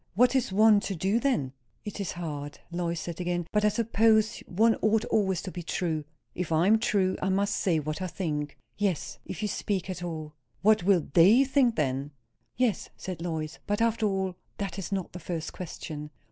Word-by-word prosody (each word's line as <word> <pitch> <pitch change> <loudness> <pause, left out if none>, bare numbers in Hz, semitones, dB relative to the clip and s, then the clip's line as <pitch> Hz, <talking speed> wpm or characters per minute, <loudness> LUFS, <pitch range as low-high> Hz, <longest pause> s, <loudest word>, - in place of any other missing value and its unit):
"What 250 +5 +4
is 255 -7 +1
one 215 +1 +6
to 200 -1 -3
do 195 +7 +1
then?" 240 - 0 0.3
"It 210 0 -6
is 200 - -2
hard," 145 -4 -5
Lois 170 -1 -2
said 170 +2 -5
again. 175 -1 -1
"But 210 0 +2
I 210 - +5
suppose 220 0 +3
one 225 +5 +4
ought 215 0 +3
always 190 -5 +1
to 185 - -5
be 175 - -6
true." 160 -2 -2 0.3
"If 180 -2 -4
I 160 +2 +3
am 220 +3 +5
true, 195 -4 +1
I 190 - 0
must 200 +2 +1
say 175 -4 +1
what 155 +4 -4
I 185 - -1
think." 155 -5 -3 0.2
"Yes. 195 -6 -1
If - - -5
you - - +1
speak 190 -2 -2
at 180 - -6
all." 155 -3 -5 0.3
"What 215 0 +5
will 180 -2 +3
they 200 +10 +7
think 265 -3 +3
then?" 135 -1 -1 0.5
"Yes," 240 -6 +1
said 180 -3 -6
Lois. 160 -3 -4
"But, 205 0 0
after 230 -1 +2
all, 190 -2 -1 0.2
that 195 -2 -4
is 195 - -5
not 190 -3 -2
the 180 - -6
first 165 -1 -4
question." 150 -4 -6
185 Hz, 200 wpm, -28 LUFS, 165-210 Hz, 0.5 s, they